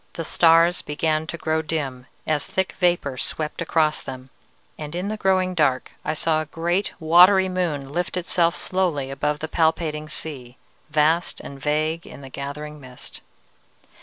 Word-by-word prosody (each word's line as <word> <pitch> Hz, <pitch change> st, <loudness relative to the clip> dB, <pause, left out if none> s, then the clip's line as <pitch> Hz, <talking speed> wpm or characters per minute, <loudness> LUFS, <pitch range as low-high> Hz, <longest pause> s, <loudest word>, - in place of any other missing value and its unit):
The 165 Hz, -, -4 dB
stars 165 Hz, +2 st, +4 dB
began 155 Hz, +1 st, -1 dB
to 170 Hz, -, -5 dB
grow 160 Hz, -1 st, 0 dB
dim 140 Hz, -5 st, -4 dB, 0.2 s
as 150 Hz, -2 st, 0 dB
thick 190 Hz, 0 st, -1 dB
vapor 175 Hz, -8 st, +1 dB
swept 155 Hz, 0 st, -3 dB
across 155 Hz, -2 st, +1 dB
them, 130 Hz, 0 st, -9 dB, 0.4 s
and 150 Hz, +1 st, -7 dB
in 185 Hz, +3 st, -2 dB
the 215 Hz, -, -2 dB
growing 185 Hz, -3 st, +1 dB
dark 145 Hz, -7 st, +1 dB
I -, -, -2 dB
saw 155 Hz, 0 st, +1 dB
a 155 Hz, -, -6 dB
great, 175 Hz, +5 st, -1 dB
watery 180 Hz, +4 st, +6 dB
moon 170 Hz, -7 st, -2 dB
lift 175 Hz, +2 st, -2 dB
itself 170 Hz, -1 st, +1 dB
slowly 165 Hz, -8 st, -1 dB
above 150 Hz, +2 st, -1 dB
the 155 Hz, -, -5 dB
palpitating 160 Hz, -2 st, 0 dB
sea, 130 Hz, -5 st, -5 dB, 0.3 s
vast 155 Hz, +3 st, +2 dB
and 140 Hz, -, -9 dB
vague 155 Hz, +3 st, -1 dB
in -, -, -11 dB
the 135 Hz, -, -10 dB
gathering 150 Hz, +3 st, -6 dB
mist. 130 Hz, -1 st, -11 dB
155 Hz, 160 wpm, -23 LUFS, 150-175 Hz, 0.4 s, watery